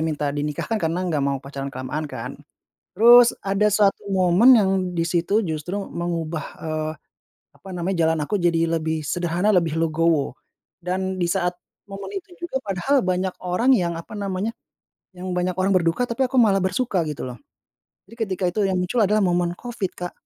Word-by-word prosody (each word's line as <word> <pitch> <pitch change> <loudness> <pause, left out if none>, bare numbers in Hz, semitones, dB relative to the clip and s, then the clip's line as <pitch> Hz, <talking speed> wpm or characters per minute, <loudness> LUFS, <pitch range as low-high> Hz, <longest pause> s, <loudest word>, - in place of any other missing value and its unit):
minta 150 -2 -1
dinikahkan 150 +9 -2
karena 170 +3 -1
gak 150 - +1
mau 140 -1 0
pacaran 140 0 -5
kelamaan 135 +3 -4
kan, - - -6 0.6
terus 240 +3 +7
ada 195 +2 +2
suatu 205 -1 +2
momen 195 +6 +5
yang 200 -4 +3 0.3
di 165 - +1
situ 175 +6 +1
justru 160 +2 -4 0.2
mengubah, 165 -2 -3
eee, 155 -1 -3 0.7
apa 195 - -14
namanya 180 +1 -2
jalan 160 0 +1
aku 150 +8 -1
jadi 170 -2 +1
lebih 160 0 -2
sederhana 175 +5 -1
lebih 165 -2 +1
legowo, 160 -4 +1 0.5
dan 190 +1 -2
di 180 - 0
saat 175 +1 0 0.3
momen 200 - -7
itu 360 -1 -19
juga 345 -6 -4
padahal 215 +6 +1
banyak 185 -1 -1
orang 185 +9 +2
yang 175 -8 +1
apa 165 - -9
namanya, 200 +1 -3 0.6
yang 185 +1 -5
banyak 180 0 -1
orang 190 +1 +1
berduka 175 +5 +2
tapi 245 +2 -1
aku 260 - -3
malah 205 -5 +5
bersuka 190 +2 0
gitu 150 - -5
loh, 125 -3 -8 0.6
jadi 230 - -16
ketika 190 0 -3
itu 215 - -1
yang 190 - 0
muncul 180 +7 0
adalah 210 0 +3
momen 175 -1 0
Covid, 235 -6 -4
Kak. 180 0 -5
180 Hz, 170 wpm, -23 LUFS, 165-200 Hz, 0.7 s, terus